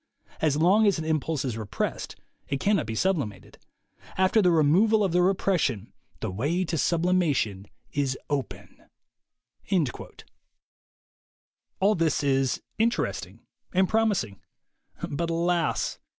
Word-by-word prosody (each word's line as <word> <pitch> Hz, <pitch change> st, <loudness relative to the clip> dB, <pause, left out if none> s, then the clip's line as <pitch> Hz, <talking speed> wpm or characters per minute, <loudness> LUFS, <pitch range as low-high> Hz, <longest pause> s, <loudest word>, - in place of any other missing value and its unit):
As 150 Hz, -2 st, +2 dB
long 195 Hz, +7 st, +4 dB
as 200 Hz, -, +3 dB
an 160 Hz, -, -4 dB
impulse 155 Hz, -2 st, -1 dB
is 125 Hz, -4 st, -2 dB
repressed, 110 Hz, -3 st, -4 dB, 0.3 s
it 140 Hz, -, -2 dB
cannot 200 Hz, -, +1 dB
be 110 Hz, -, -4 dB
sublimated. 125 Hz, -, -2 dB, 0.6 s
After 190 Hz, +4 st, +4 dB
the 180 Hz, -, +4 dB
removal 180 Hz, +8 st, +4 dB
of 190 Hz, -, +1 dB
the 180 Hz, +1 st, +3 dB
repression, 175 Hz, -, 0 dB, 0.3 s
the 110 Hz, -, -2 dB
way 150 Hz, -, -1 dB
to 165 Hz, -, -3 dB
sublimation 160 Hz, -, +1 dB, 0.2 s
is 135 Hz, -2 st, -1 dB
open." 145 Hz, -2 st, -5 dB, 3.0 s
All 200 Hz, +3 st, +4 dB
this 165 Hz, -5 st, 0 dB
is 135 Hz, -2 st, +1 dB, 0.2 s
interesting 100 Hz, -, -1 dB, 0.3 s
and 190 Hz, 0 st, +4 dB
promising. 205 Hz, -, 0 dB, 0.7 s
But 165 Hz, +4 st, -3 dB
alas! 170 Hz, +1 st, 0 dB
160 Hz, 115 wpm, -26 LUFS, 130-185 Hz, 3.0 s, long